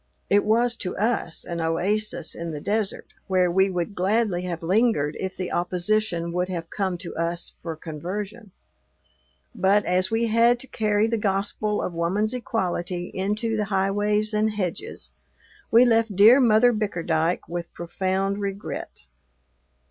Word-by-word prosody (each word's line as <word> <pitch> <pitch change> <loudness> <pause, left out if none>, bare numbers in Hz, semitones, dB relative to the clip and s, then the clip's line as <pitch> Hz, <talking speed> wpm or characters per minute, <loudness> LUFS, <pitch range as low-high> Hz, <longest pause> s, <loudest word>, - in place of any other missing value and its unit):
It 205 +1 +5
was, 230 +2 +2
to 180 - -4
us, 215 -6 -1
an 170 -1 -4
oasis 175 +3 -1
in 170 0 -5
the 150 - -4
desert, 205 +4 -2 0.2
where 185 -2 +2
we 190 +2 +3
would 180 +2 -2
gladly 200 0 +1
have 175 -2 -5
lingered 185 -5 +2
if 190 0 -4
the 185 -1 -4
opposition 180 0 0
would 180 +1 -1
have 170 -2 -5
come 190 -3 -1
to 175 - -8
us 170 +1 -2
for 165 -2 -5
conversion. 195 +8 -6 1.0
But, 200 -1 +2
as 185 +1 +1
we 225 +1 +1
had 230 +2 +4
to - - -9
carry 210 -3 +1
the 225 0 0
gospel 205 +1 -1
of 180 - -3
woman's 190 +7 0
equality 180 -7 -2
into 210 +4 -1
the 210 -1 0
highways 205 +2 0
and 215 +1 +2
hedges, 195 -5 -5 0.6
we 235 +2 +6
left 225 -3 +2
dear 220 +7 +8
Mother 240 0 +5
Bickerdyke 175 -5 -1
with 170 0 -5
profound 190 +3 -2
regret. 200 0 -5
195 Hz, 150 wpm, -24 LUFS, 175-215 Hz, 1.0 s, dear